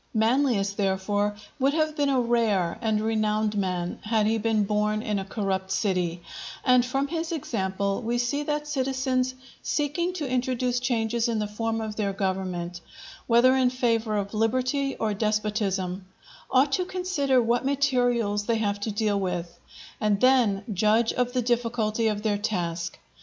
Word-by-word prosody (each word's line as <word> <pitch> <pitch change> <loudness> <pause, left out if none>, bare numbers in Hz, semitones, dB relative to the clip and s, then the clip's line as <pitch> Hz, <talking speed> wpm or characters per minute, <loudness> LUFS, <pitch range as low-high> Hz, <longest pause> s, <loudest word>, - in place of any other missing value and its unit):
Manlius, 220 -3 +2
therefore, 205 +1 0 0.2
would 275 +2 +2
have 310 -1 +1
been 285 -2 +1
a 265 -2 +2
rare 225 -7 +1
and 220 -2 +1
renowned 215 -1 0
man 180 -3 -2
had 215 -1 +1
he 225 +1 +1
been 220 -1 +1
born 210 +1 0
in 210 -3 -1
a 195 - -5
corrupt 195 -2 -2
city; 180 -4 0 0.4
and 250 -1 +5
from 270 +3 -1
his 325 +1 -3
example 200 - -2
we 240 +1 -1
see 245 +4 0
that 295 0 -2
citizens 260 -2 0 0.3
seeking 305 +4 -1
to 315 -6 -3
introduce 250 -1 0
changes 235 -1 0
in 230 - 0
the 210 - 0
form 225 +2 -2
of 215 -1 -5
their 200 -2 0
government, 185 -3 -3 0.5
whether 245 +2 +5
in 260 -1 +3
favour 230 -4 0
of 200 0 -3
liberty 255 +5 0
or 215 -1 -1
despotism, 205 -3 -1 0.4
ought 270 +2 +3
to 365 - +1
consider 360 -8 +1
what 240 +1 +1
materials 245 -7 +1
they 230 -1 +2
have 205 -2 -1
to 205 - -3
deal 210 -1 0
with, 175 -2 -3 0.4
and 210 -2 +1
then 245 -6 +3
judge 215 +4 +2
of 245 0 -1
the 250 -1 +1
difficulty 230 -2 0
of 210 -1 -1
their 205 -2 +1
task. 175 -5 -2
225 Hz, 160 wpm, -26 LUFS, 205-255 Hz, 0.5 s, and